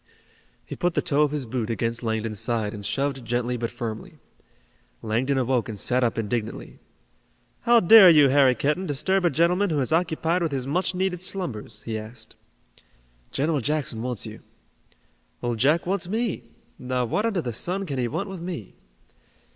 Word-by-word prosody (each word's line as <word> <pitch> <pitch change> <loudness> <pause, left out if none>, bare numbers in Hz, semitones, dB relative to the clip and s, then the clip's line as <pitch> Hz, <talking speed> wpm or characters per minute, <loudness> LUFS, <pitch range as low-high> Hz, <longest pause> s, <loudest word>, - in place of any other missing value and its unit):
He - - -7
put 175 -2 -1
the - - +2
toe 145 +1 +1
of 150 - +4
his 145 -2 -3
boot 115 -1 -3
against 115 0 -2
Langdon's 110 -2 -2
side 110 -4 -1
and 105 -1 -8
shoved 135 +4 -2
gently 120 +1 -1
but 115 -1 -3
firmly. 115 -2 -6 0.9
Langdon 125 +6 0
awoke 125 -1 0
and 105 -2 -5
sat 125 +5 +1
up 115 -1 0
indignantly. 110 0 -4 0.9
"How 240 0 +8
dare 200 0 +9
you, 150 -4 +6
Harry 135 -2 +5
Kenton, 150 +10 -1
disturb 185 +7 0
a - - +5
gentleman 175 +6 +2
who 155 -3 0
is 135 +3 0
occupied 165 +1 +1
with 165 -4 -1
his 130 -2 -2
much 180 +6 -1
needed 180 -1 -1
slumbers?" 125 - -3
he 110 -1 -3
asked. 110 +1 -10 0.9
"General 150 0 0
Jackson 140 -4 -1
wants 125 -3 -2
you." - - -9 1.0
"Old 120 -2 -2
Jack 150 +7 +3
wants 185 -1 -1
me! 220 - -2 0.3
Now, 125 -1 -1
what 205 - 0
under 200 -6 -1
the 120 - -3
sun 185 - -2
can 140 -6 -4
he 120 - 0
want 165 - -3
with 190 -3 -7
me?" 170 - -6
135 Hz, 175 wpm, -25 LUFS, 115-175 Hz, 1.0 s, dare